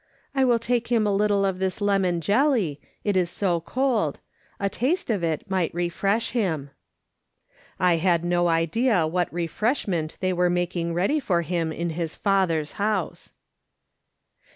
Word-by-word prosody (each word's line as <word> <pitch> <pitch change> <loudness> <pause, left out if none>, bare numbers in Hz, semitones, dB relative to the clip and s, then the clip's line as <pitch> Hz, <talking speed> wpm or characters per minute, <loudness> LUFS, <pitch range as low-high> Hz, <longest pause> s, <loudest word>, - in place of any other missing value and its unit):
" - - -38
I 265 -1 +3
will 240 -2 +4
take 235 0 -1
him 230 -3 +2
a 205 - +1
little 200 -1 +2
of 190 -1 -1
this 190 +1 -1
lemon 195 -4 +1
jelly, 205 - +1 0.2
it 205 -2 0
is 180 -2 +2
so 175 -3 0
cold. 235 - 0 0.4
A 200 - 0
taste 265 - -1
of 200 -5 -1
it 160 +1 -1
may 185 -4 0
refresh 195 +6 0
him." 160 - -1 1.1
I 180 -1 +3
had 170 0 +1
no 175 0 +2
idea 170 +4 +2
what 175 +2 -1
refreshment 175 - -1
they 185 -1 0
were 180 0 +2
making 175 -1 -1
ready 195 - +1
for 175 -10 0
him 165 -1 -1
in 170 +1 -3
his 165 0 -4
Father's 180 -7 +1
house. 205 -4 -2
185 Hz, 155 wpm, -25 LUFS, 170-210 Hz, 1.1 s, will